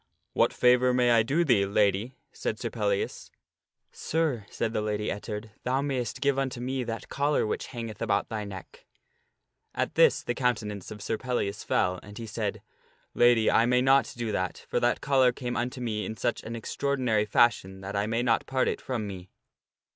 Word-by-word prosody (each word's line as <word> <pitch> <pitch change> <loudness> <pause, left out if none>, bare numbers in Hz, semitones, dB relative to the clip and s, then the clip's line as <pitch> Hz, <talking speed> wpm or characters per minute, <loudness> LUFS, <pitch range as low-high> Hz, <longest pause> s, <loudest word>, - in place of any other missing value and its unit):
" - - -50
What - - +3
favor 125 0 +4
may 125 -1 +4
I 115 -1 +6
do 145 +10 +1
thee, 120 -9 +4
Lady 100 +4 +1
?" - - -47
said - - -2
Sir - - -3
Pellias. 470 -3 -2 0.3
" - - -65 0.2
Sir," 160 - -1
said 115 -1 -2
the 110 - 0
Lady 105 0 -1
Ettard, 105 +1 -6
"thou 130 +2 0
mayst 130 -5 -2
give 140 -1 +2
unto 130 -3 -2
me 130 +1 -2
that 115 -1 -5
collar 145 -1 +1
which 105 - -3
hangeth 115 -4 -7
about 100 0 +1
thy 110 -1 -4
neck." 95 -3 -10 0.9
At - - -1
this - - +4
the 120 - -1
countenance 110 -6 -2
of 105 -1 -8
Sir 110 - -2
Pellias 120 -6 -2
fell, 90 -1 +1
and 105 0 -12
he 115 - -5
said, 110 - -3 0.3
" - - -36
Lady, 120 -2 +4
I 115 - +4
may 125 0 +3
not 135 0 +4
do 115 -2 -2
that; 95 -3 -3
for - - 0
that - - +1
collar 130 -3 +4
came 125 0 -4
unto 125 +2 -2
me 110 -4 -2
in 110 - -5
such 120 +5 -1
an 115 - -6
extraordinary 125 -2 0
fashion 100 -3 +2
that 95 +1 -6
I 100 +1 0
may 115 +2 0
not 115 -2 +1
part 130 -1 +1
it - - -2
from 120 -5 -3
me." 95 -2 -8
120 Hz, 200 wpm, -28 LUFS, 105-130 Hz, 0.9 s, I